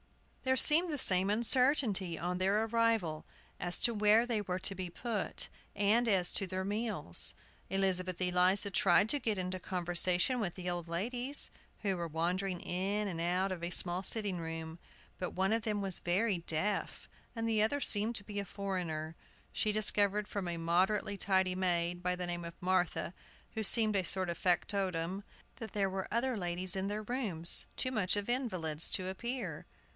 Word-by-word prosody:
There 260 0 +1
seemed 325 +6 +5
the 295 - -2
same 190 -6 +2
uncertainty 230 - +2
on 180 +3 -3
their 200 +3 +2
arrival 225 -8 0 0.4
as 175 0 +1
to 235 - +3
where 210 +2 +4
they 230 -3 -1
were 185 -2 -3
to 185 - +2
be 185 -2 -5
put, 220 +3 -3 0.3
and 210 +4 +2
as 190 -5 +2
to 195 - +1
their 185 +1 -4
meals. 205 - -1 0.3
Elizabeth 185 -2 0
Eliza 185 +2 +2
tried 195 +2 +4
to 290 - +3
get 220 -6 -1
into 185 0 -3
conversation 180 +6 0
with 190 -6 -3
the 180 -1 -7
old 175 -1 -3
ladies, 245 +11 0 0.3
who 195 -2 0
were 170 -1 -4
wandering 175 +3 -2
in 200 +4 -2
and 170 -4 -4
out 180 +3 0
of 175 -2 -5
a 170 - -2
small 175 0 +3
sitting 200 -2 -3
room. 165 0 -6 0.4
But 180 - -3
one 190 +3 0
of 225 - +1
them 210 -2 -2
was 190 -2 -2
very 190 +2 0
deaf, 170 +5 -2 0.3
and 225 0 -2
the 220 -2 +1
other 255 +7 +1
seemed 220 -2 +1
to 200 - +1
be 205 0 -5
a - - -2
foreigner. 180 -6 -4 0.4
She 215 - 0
discovered 210 -1 +2
from 200 -3 -4
a 170 -1 -3
moderately 190 +5 +1
tidy 190 -2 +1
maid, 175 -1 0
by 180 0 0
the 180 0 -4
name 175 0 -4
of 170 0 -9
Martha, 180 -2 -1 0.4
who 220 - -3
seemed 215 0 +6
a 190 - +2
sort 185 0 -2
of 170 - -6
factotum, 185 0 -1 0.3
that 225 -4 -8
there 195 -2 0
were 190 0 -4
other 245 +2 0
ladies 180 -1 0
in 190 0 -2
their 210 +1 -3
rooms, 205 -9 +3
too 255 - -1
much 210 -6 +1
of 205 - -3
invalids 185 - +1
to 185 - +3
appear. 235 +7 -5
190 Hz, 180 wpm, -33 LUFS, 175-215 Hz, 0.4 s, seemed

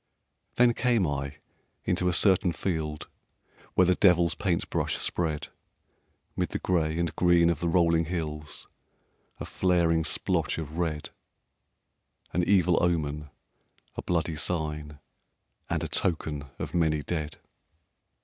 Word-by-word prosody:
Then 120 0 +5
came 120 -5 +2
I 70 -1 -3 0.5
into 90 0 +1
a - - +3
certain 95 -1 +4
field 80 -5 -3 0.7
Where 90 - +5
the 90 - +4
devil's 90 -3 +4
paint 90 -2 -1
brush - - 0
spread 80 -4 -2 0.9
'Mid - - -1
the - - -3
gray 80 -3 0
and 85 -2 -1
green 85 -1 +4
of 80 - -3
the 85 - -1
rolling 85 -1 +3
hills 75 -3 -5 0.7
A - - -5
flaring 85 -3 +1
splotch 80 - +1
of 80 +1 -5
red, 80 -3 -2 1.2
An 90 - +1
evil 90 -2 +3
omen, 75 -4 -1 0.7
a - - -4
bloody 80 -2 -1
sign, 75 -3 -2 0.7
And - - -1
a - - -2
token 80 -5 -1
of - - -5
many 80 -3 +1
dead. 80 -3 -4
85 Hz, 130 wpm, -27 LUFS, 75-90 Hz, 1.2 s, Then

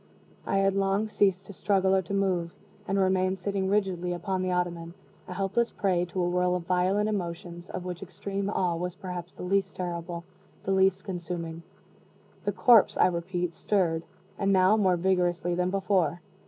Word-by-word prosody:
I 195 - +1
had 195 0 +3
long 195 +2 +1
ceased 195 -2 +2
to 200 - -10
struggle 190 0 +2
or 190 - +3
to 190 +2 -7
move, 180 -4 0 0.3
and 195 - 0
remained 185 0 +2
sitting 190 0 -1
rigidly 185 -3 0
upon 185 +2 -2
the 185 0 -1
ottoman, 175 -1 -2 0.3
a 180 - -6
helpless 200 +5 0
prey 180 -3 0
to 180 +1 -2
a - - +1
whirl 180 0 +1
of 180 - -3
violent 185 +4 +2
emotions, 175 -3 -4
of 180 - -5
which 180 -1 -5
extreme 195 +2 -4
awe 180 -4 0
was 180 +1 -3
perhaps 180 -2 -7
the - - -8
least 190 +1 0
terrible, 170 -1 -4 0.4
the 195 - -1
least 190 0 +3
consuming. 170 -3 -5 0.8
The - - +2
corpse, 235 -5 +5
I - - +5
repeat, 175 0 -2
stirred, 170 -6 0 0.4
and 195 -1 +2
now 190 +2 +5
more 190 -4 +3
vigorously 175 -1 +1
than 180 +1 0
before. 185 -4 +1
185 Hz, 175 wpm, -28 LUFS, 175-195 Hz, 0.8 s, corpse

